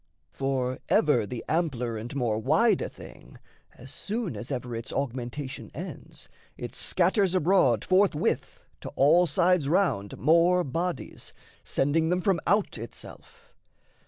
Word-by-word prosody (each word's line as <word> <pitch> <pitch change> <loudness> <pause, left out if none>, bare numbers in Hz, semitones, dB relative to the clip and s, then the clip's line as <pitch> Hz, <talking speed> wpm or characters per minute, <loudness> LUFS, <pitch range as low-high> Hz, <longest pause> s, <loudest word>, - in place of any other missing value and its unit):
For 130 +1 -2
ever 125 -9 +3
the 120 +2 -6
ampler 130 -8 -1
and 115 +5 -6
more 120 -5 0
wide 155 - +3
a - - -3
thing, - - -14 0.4
As - - -11
soon 205 - -3
as 110 +3 -7
ever 125 -2 -4
its 115 +2 -6
augmentation 130 +1 -4
ends, 180 +5 -8 0.3
It - - -6
scatters 195 -5 +1
abroad 155 - +3
forthwith 185 -4 +1
to - - -7
all 165 +6 +5
sides 170 -1 +2
round 155 - 0
More 170 +6 +4
bodies, 170 +5 -4 0.3
sending 160 +4 +1
them 180 +1 +1
from 190 -2 +1
out 205 - +1
itself. 115 0 -11
150 Hz, 130 wpm, -27 LUFS, 125-180 Hz, 0.4 s, all